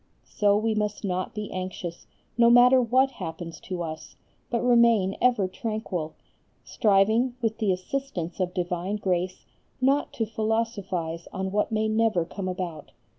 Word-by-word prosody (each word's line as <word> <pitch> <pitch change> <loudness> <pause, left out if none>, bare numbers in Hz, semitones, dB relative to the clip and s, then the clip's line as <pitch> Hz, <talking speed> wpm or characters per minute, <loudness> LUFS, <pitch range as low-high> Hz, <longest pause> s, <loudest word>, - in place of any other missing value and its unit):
So 205 -1 +2
we 220 +1 +1
must 210 0 -2
not 185 0 -2
be 210 -1 -5
anxious, 185 -2 -6 0.3
no 235 0 +5
matter 250 +2 +7
what 255 +3 +3
happens 165 -6 -7
to 180 -2 -5
us, 160 -1 -7 0.3
but 235 0 -1
remain 235 -5 +4
ever 240 -6 +3
tranquil, 200 - -4 0.5
striving 220 +4 +2
with 225 -2 -1
the 210 -4 +2
assistance 185 -2 -4
of 180 -1 0
divine 180 +2 -2
grace 185 -2 -2 0.3
not 275 +3 +2
to 225 - -1
philosophize 210 -7 -2
on 190 0 -3
what 210 +3 0
may 220 0 +1
never 215 -5 +2
come 185 +2 -5
about. 180 -5 -5
205 Hz, 145 wpm, -26 LUFS, 180-230 Hz, 0.5 s, matter